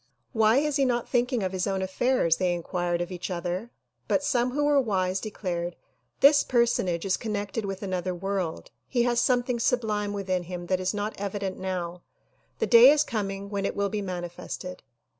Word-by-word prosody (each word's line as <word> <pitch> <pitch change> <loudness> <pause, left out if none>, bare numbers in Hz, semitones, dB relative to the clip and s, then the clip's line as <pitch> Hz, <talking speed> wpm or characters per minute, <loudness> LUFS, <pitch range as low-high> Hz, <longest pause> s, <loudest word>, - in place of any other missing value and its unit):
' - - -47
' - - -48
Why 220 +3 +5
is 295 0 +1
he 275 - +3
not 240 -2 0
thinking 245 -2 +1
of 185 - -1
his 185 0 -1
own 190 -1 -1
affairs?" 190 -3 +1
they 180 -1 +1
inquired 175 0 -2
of 175 - -4
each 180 +1 -5
other; 180 +5 -3 0.4
but 285 - +1
some 245 -2 +1
who 290 +4 -1
were 290 -1 +4
wise 190 -5 0
declared 175 -5 -4 0.5
"This 285 +1 +7
personage 215 -9 +1
is 195 - +1
connected 205 -1 -3
with 195 0 -5
another 185 -1 -2
world; 190 -2 -3 0.2
he 240 -2 +1
has 240 -1 +2
something 245 0 +1
sublime 215 -4 0
within 185 -3 -2
him 175 0 -6
that 185 +1 0
is 185 +2 -1
not 210 +1 -2
evident 200 -1 -3
now; 180 -2 -4 0.6
the - - 0
day 240 +2 +9
is 300 0 +5
coming 200 -4 -4
when 200 -1 -2
it - - -2
will 200 0 0
be 210 +1 -2
manifested." 180 0 -6
200 Hz, 195 wpm, -27 LUFS, 180-235 Hz, 0.6 s, day